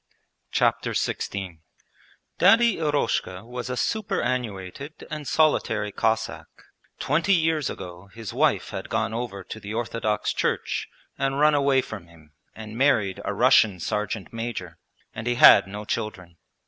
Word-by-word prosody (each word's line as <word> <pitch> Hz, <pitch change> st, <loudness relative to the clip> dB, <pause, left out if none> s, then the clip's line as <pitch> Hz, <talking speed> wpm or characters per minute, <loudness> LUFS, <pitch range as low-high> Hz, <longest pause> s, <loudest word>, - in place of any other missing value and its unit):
Chapter -, -, +1 dB
XVI 95 Hz, -5 st, -3 dB, 0.8 s
Daddy 230 Hz, 0 st, +5 dB
Eroshka 145 Hz, -, -1 dB
was 125 Hz, +1 st, -6 dB
a 125 Hz, -, -3 dB
superannuated 125 Hz, -, -3 dB
and 150 Hz, -2 st, -5 dB
solitary 110 Hz, -9 st, +2 dB
Cossack: 110 Hz, +2 st, -1 dB, 0.5 s
twenty 165 Hz, +7 st, +2 dB
years 160 Hz, -4 st, +1 dB
ago 90 Hz, +1 st, -8 dB
his 115 Hz, -1 st, -8 dB
wife -, -, +1 dB
had -, -, -6 dB
gone -, -, -1 dB
over 110 Hz, -5 st, -4 dB
to 110 Hz, -, -8 dB
the 105 Hz, +1 st, -6 dB
Orthodox 115 Hz, -2 st, -1 dB
Church -, -, -1 dB, 0.3 s
and 135 Hz, 0 st, 0 dB
run 150 Hz, +1 st, +5 dB
away 140 Hz, -2 st, +3 dB
from 100 Hz, -6 st, -8 dB
him 80 Hz, -3 st, -20 dB, 0.2 s
and 110 Hz, 0 st, -9 dB
married 115 Hz, -8 st, +2 dB
a -, -, -2 dB
Russian 100 Hz, -4 st, +4 dB
sergeant 105 Hz, +3 st, -3 dB
major, 115 Hz, -7 st, -5 dB, 0.3 s
and 110 Hz, -, -6 dB
he 120 Hz, -, +1 dB
had 95 Hz, -, +8 dB
no 105 Hz, +2 st, -7 dB
children. 90 Hz, -7 st, -4 dB
115 Hz, 135 wpm, -25 LUFS, 100-140 Hz, 0.8 s, had